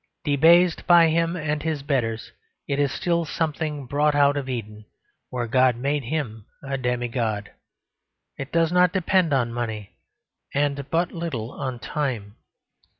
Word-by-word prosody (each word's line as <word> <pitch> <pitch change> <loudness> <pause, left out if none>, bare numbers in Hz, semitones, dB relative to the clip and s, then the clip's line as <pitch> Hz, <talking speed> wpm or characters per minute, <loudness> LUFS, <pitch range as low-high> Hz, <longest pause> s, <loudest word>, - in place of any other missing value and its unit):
Debased 165 +4 +4
by 170 -2 +7
him 165 +2 +1
and 150 -3 -2
his 155 -3 -2
betters, 120 -6 -1 0.4
it 140 0 -1
is 145 -1 +2
still 170 -1 0
something 155 -2 -3
brought 145 +3 +1
out 145 0 +4
of 140 -2 -3
Eden, 110 -4 -6 0.4
where 125 -1 -3
God 130 +1 +3
made 140 +2 -1
him 115 -7 -4 0.2
a 140 0 -3
demigod: 120 -4 -2 0.8
it 135 +1 -7
does 165 -1 +2
not 180 -1 +4
depend 185 -2 +2
on 120 -4 +1
money 110 -4 -4 0.6
and 140 -1 0
but 170 +2 0
little 145 - -4
on 130 -4 -4
time. 120 -5 -3
140 Hz, 145 wpm, -24 LUFS, 120-160 Hz, 0.8 s, by